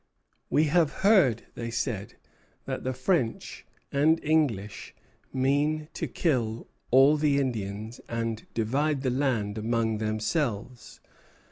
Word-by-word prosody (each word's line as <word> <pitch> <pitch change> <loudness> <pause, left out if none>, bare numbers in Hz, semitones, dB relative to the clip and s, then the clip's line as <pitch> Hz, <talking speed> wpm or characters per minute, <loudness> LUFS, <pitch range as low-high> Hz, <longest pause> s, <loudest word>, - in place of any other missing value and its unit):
"We 150 - +3
have 160 0 +3
heard," 175 - +5
they 115 -1 -5
said, 115 -4 -3 0.5
"that - - -4
the 130 - -1
French 130 -1 -1 0.2
and 155 +4 +3
English 135 -10 0 0.4
mean 145 +4 +1
to - - -3
kill 120 -8 -1 0.2
all 135 +4 +6
the 145 -2 +2
Indians 110 -3 -4
and 115 -1 -3
divide 135 +6 0
the 130 - +1
land 120 -6 0
among 110 -1 0
themselves." 110 +1 -2
125 Hz, 115 wpm, -27 LUFS, 110-150 Hz, 0.5 s, all